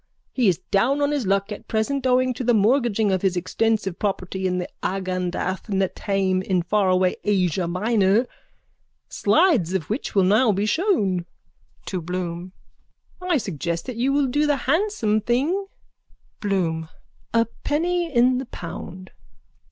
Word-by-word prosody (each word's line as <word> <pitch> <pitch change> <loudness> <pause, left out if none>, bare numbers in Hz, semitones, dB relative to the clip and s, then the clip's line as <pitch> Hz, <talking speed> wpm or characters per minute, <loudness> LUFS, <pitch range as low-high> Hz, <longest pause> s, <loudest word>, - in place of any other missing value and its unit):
He 250 -4 +2
is 180 -4 +3
down 245 +9 +2
on 285 0 +1
his 280 -8 -1
luck 195 +2 +1
at 210 - -7
present 260 +5 -1
owing 255 0 +3
to 250 - -5
the 240 -1 +3
mortgaging 220 -1 +2
of 190 -1 0
his 185 -2 +1
extensive 195 +1 -1
property 190 -2 -2
at 180 -1 -2
Agendath 185 0 -2
Netaim 190 -1 0
in 185 -2 0
faraway 185 -1 +2
Asia 185 -4 +1
Minor, 205 +4 +2 0.8
slides 210 - +2
of 175 -1 -3
which 225 0 -3
will 195 - +5
now 215 +5 +4
be 200 +1 0
shown. 210 - +1 0.6
(To 185 -3 -3
Bloom.) 175 +1 -4 0.7
I 360 -3 +1
suggest 170 - -3
that 255 - -5
you 250 +4 +1
will 285 0 +2
do 290 +4 +1
the 290 -1 +2
handsome 275 - +1
thing. 290 - 0 0.7
BLOOM: 165 -6 -1 0.4
A 230 0 +3 0.2
penny 340 +3 0
in 250 0 +3
the 260 - -6
pound. 185 +1 -8
205 Hz, 145 wpm, -23 LUFS, 185-255 Hz, 0.8 s, will